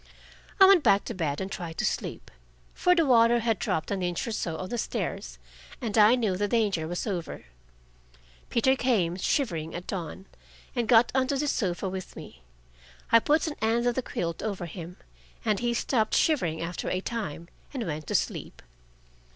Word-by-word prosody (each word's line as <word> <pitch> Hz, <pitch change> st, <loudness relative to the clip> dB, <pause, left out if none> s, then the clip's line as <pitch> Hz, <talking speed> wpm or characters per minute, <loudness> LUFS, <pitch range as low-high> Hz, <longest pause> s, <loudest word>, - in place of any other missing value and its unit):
I 385 Hz, -, +10 dB
went 385 Hz, -3 st, +7 dB
back 200 Hz, 0 st, +4 dB
to -, -, -4 dB
bed 155 Hz, -7 st, -2 dB
and 190 Hz, 0 st, -4 dB
tried 170 Hz, -5 st, -6 dB
to -, -, 0 dB
sleep, -, -, -3 dB, 0.4 s
for 360 Hz, 0 st, +3 dB
the 335 Hz, -2 st, +3 dB
water 240 Hz, -2 st, +5 dB
had 225 Hz, -3 st, 0 dB
dropped 160 Hz, -, -2 dB
an 195 Hz, -2 st, -1 dB
inch 175 Hz, -1 st, -2 dB
or -, -, -2 dB
so 165 Hz, -6 st, -3 dB
on 185 Hz, -, -5 dB
the 240 Hz, -, -2 dB
stairs, -, -, -4 dB, 0.4 s
and 225 Hz, -5 st, -3 dB
I 215 Hz, +2 st, +7 dB
knew 220 Hz, -7 st, 0 dB
the 205 Hz, +2 st, 0 dB
danger 205 Hz, -8 st, +1 dB
was 175 Hz, +2 st, -3 dB
over. 180 Hz, -, -4 dB, 1.0 s
Peter 260 Hz, +3 st, +3 dB
came, 210 Hz, -11 st, +1 dB
shivering, 175 Hz, -, -1 dB
at 175 Hz, +1 st, -6 dB
dawn, 190 Hz, 0 st, -5 dB, 0.5 s
and 240 Hz, -3 st, 0 dB
got 235 Hz, -1 st, +5 dB
on 260 Hz, 0 st, +2 dB
to 280 Hz, 0 st, 0 dB
the 295 Hz, +2 st, -1 dB
sofa 190 Hz, -8 st, -1 dB
with 185 Hz, 0 st, -6 dB
me. 65 Hz, -, -11 dB, 0.7 s
I 230 Hz, -, +8 dB
put 300 Hz, +7 st, +2 dB
an 315 Hz, -, -2 dB
end 230 Hz, +2 st, +1 dB
of 245 Hz, -, +2 dB
the 260 Hz, -, -1 dB
quilt 170 Hz, -8 st, -4 dB
over 200 Hz, -5 st, -3 dB
him, 170 Hz, +1 st, -8 dB, 0.5 s
and 215 Hz, -3 st, +2 dB
he 240 Hz, 0 st, 0 dB
stopped 230 Hz, -2 st, 0 dB
shivering 175 Hz, -, +1 dB
after 170 Hz, +2 st, -3 dB
a 185 Hz, -, 0 dB
time 185 Hz, -7 st, -5 dB, 0.2 s
and 260 Hz, -5 st, -4 dB
went 155 Hz, -3 st, -5 dB
to -, -, -2 dB
sleep. -, -, -2 dB
210 Hz, 190 wpm, -27 LUFS, 175-240 Hz, 1.0 s, I